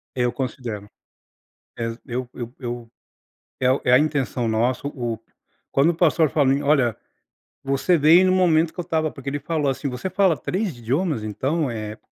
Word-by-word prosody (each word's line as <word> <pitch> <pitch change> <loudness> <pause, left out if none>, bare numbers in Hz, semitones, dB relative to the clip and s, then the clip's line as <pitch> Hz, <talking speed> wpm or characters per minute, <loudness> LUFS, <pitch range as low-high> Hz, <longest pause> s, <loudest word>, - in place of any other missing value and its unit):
Eu 125 -1 +1
considero. 120 -6 -5 0.9
É, 115 0 -3
eu 125 0 -3
eu 120 -1 -6 1.1
eu, 130 +1 +3
é 125 - +3
a 125 - +8
intenção 140 -5 0
nossa 120 +5 0
o, 120 -5 -4 0.5
quando 140 +5 +3
o 175 - -1
pastor 160 -2 +3
fala 145 -4 +3
assim: 140 +1 0
"Olha, 135 -6 +2 0.7
você 140 +6 +2
veio 165 +5 +6
no - - +3
momento 165 -3 +3
que - - -11
eu 175 - -1
estava", 160 -1 0
porque 140 0 -6
ele 145 +1 -3
falou 150 -3 -1
assim: 135 +2 -2
"Você 130 +9 -4
fala 185 -4 +3
3 190 - -2
idiomas 135 - -1
então 135 +8 -1
é 110 -1 -5
140 Hz, 170 wpm, -23 LUFS, 120-160 Hz, 1.1 s, a